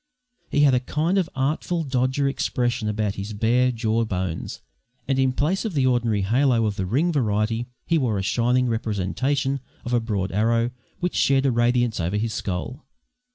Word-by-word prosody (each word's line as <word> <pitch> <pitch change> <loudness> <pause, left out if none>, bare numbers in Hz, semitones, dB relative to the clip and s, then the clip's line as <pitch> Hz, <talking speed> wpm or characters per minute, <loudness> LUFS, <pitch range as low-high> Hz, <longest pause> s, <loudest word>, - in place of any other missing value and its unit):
He 145 - +2
had 140 -3 +5
a 125 - +4
kind 160 +9 0
of 175 -3 -1
Artful 155 +5 -1
Dodger 130 0 0
expression 120 -4 -1
about 105 -1 -1
his 105 +2 -6
bare 120 +4 +2
jaw 115 -1 0
bones, 95 -6 -4 0.4
and 135 -1 +1
in 130 -1 +3
place 155 +9 0
of 215 -7 -3
the 135 -2 +2
ordinary 120 -5 +1
halo 120 +2 +2
of 105 -2 -1
the 95 -1 -3
ring 145 - +1
variety, 115 -3 0 0.2
he 165 -2 +2
wore 120 -7 0
a 95 - -2
shining 125 +5 +2
representation 120 +6 -1 0.3
of 120 - -3
a 120 - +4
broad 105 -5 -2
arrow 115 +4 +1 0.3
which 180 0 -1
shed 135 0 +3
a 135 - +3
radiance 120 -1 +1
over 90 +4 -1
his 110 +1 -1
skull. 100 +9 -4
120 Hz, 180 wpm, -24 LUFS, 110-135 Hz, 0.4 s, had